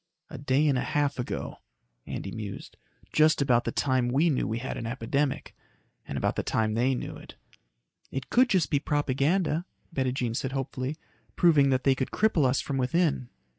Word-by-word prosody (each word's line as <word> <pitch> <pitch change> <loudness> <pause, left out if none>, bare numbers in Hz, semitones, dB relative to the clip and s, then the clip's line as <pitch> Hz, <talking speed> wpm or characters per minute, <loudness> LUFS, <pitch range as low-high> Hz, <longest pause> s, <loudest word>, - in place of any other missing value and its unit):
"A 145 - -7
day 140 +2 +2
and 135 -3 +2
half 145 0 0
ago," 125 - -4 0.5
Andy 95 - -5
mused. 105 -2 -7 0.4
"Just 155 0 +4
about 125 -4 +3
the 115 - -1
time 130 -2 +1
we 145 +7 +3
knew 130 - 0
we 110 +3 -2
had 125 +2 -4
an 115 - -4
epidemic. 130 +4 -2 0.5
And - - -4
about - - 0
the - - 0
time 110 -1 0
they 125 +4 +2
knew - - -5
it." - - -13 0.7
"It 135 -1 -6
could 255 +2 +5
be - - 0
just 180 -6 +1
propaganda," 150 +4 +1 0.3
Bettijean 130 -4 -1
said 130 +2 -2
hopefully, 135 +1 -3 0.4
"proving 155 -5 +5
that 130 -1 +1
they 135 - +5
could 130 0 -2
cripple 195 -10 +2
us 130 - +1
from 140 - -3
within." 130 -1 +1
135 Hz, 175 wpm, -28 LUFS, 125-150 Hz, 0.7 s, could